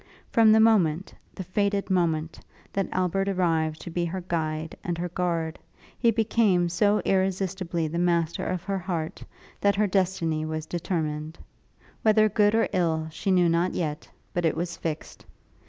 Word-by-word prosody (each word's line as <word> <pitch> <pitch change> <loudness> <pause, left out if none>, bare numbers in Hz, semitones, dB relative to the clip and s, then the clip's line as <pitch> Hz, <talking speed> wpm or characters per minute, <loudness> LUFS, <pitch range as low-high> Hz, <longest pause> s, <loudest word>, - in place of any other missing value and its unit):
From 225 -2 +6
the 220 - +6
moment, 190 -6 +3 0.2
the 190 - -5
fated 200 +2 -1
moment, 165 -3 0 0.3
that 195 -1 -1
Albert 185 +2 0
arrived 165 -4 0
to 175 - -7
be 175 +1 -1
her 185 +2 -4
guide 160 -2 -3
and 175 -1 -2
her 175 +1 -3
guard, 170 -2 -2 0.4
he 235 - +2
became 215 -5 +2
so 205 +4 +2
irresistibly 190 -3 0
the 170 +3 -3
master 170 -2 +1
of 185 -1 -2
her 195 -1 -2
heart, 170 -4 -4 0.4
that 200 -1 +3
her 210 +1 +2
destiny 180 -5 0
was 155 0 -4
determined. 160 -2 -3 0.6
Whether 215 0 +4
good 210 +1 +3
or 225 - +3
ill, 160 -4 0
she 155 +5 -4
knew 180 -2 +4
not 170 +2 +1
yet; 150 -3 -3 0.2
but 175 - -1
it 160 - +1
was 175 0 -3
fixed. 160 -1 -5
175 Hz, 160 wpm, -26 LUFS, 165-195 Hz, 0.6 s, From